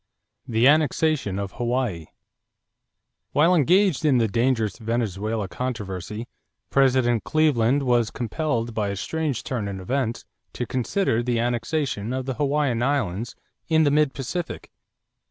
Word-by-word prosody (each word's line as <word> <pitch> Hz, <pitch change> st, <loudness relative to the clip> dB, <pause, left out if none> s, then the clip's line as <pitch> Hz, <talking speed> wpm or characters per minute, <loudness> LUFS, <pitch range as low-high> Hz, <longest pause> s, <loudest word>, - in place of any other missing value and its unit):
=The 115 Hz, +2 st, +3 dB
Annexation 150 Hz, -7 st, +2 dB
of 100 Hz, -1 st, -3 dB
Hawaii.= 120 Hz, -9 st, -2 dB, 1.3 s
While 165 Hz, +5 st, +4 dB
engaged 180 Hz, +1 st, +3 dB
in 145 Hz, -4 st, +4 dB
the 115 Hz, -2 st, +3 dB
dangerous 115 Hz, -1 st, 0 dB
Venezuela 110 Hz, -2 st, -2 dB
controversy, 105 Hz, -2 st, -5 dB, 0.4 s
President 130 Hz, -5 st, +3 dB
Cleveland 140 Hz, -, +2 dB
was 120 Hz, -3 st, +2 dB
compelled 120 Hz, -1 st, -2 dB
by 110 Hz, -2 st, -1 dB
a 100 Hz, -, -3 dB
strange 150 Hz, +5 st, -2 dB
turn 115 Hz, -6 st, -3 dB
in 100 Hz, -1 st, -5 dB
events 120 Hz, +4 st, -2 dB, 0.3 s
to 125 Hz, -, -3 dB
consider 125 Hz, -, 0 dB
the 120 Hz, 0 st, 0 dB
annexation 120 Hz, -1 st, -1 dB
of 130 Hz, 0 st, -3 dB
the 130 Hz, -, -2 dB
Hawaiian 140 Hz, -3 st, 0 dB
Islands 120 Hz, -5 st, -1 dB, 0.3 s
in 160 Hz, -1 st, +4 dB
the 145 Hz, -, +3 dB
mid 150 Hz, -1 st, +2 dB
Pacific. 165 Hz, +6 st, -5 dB
125 Hz, 130 wpm, -24 LUFS, 110-145 Hz, 1.3 s, While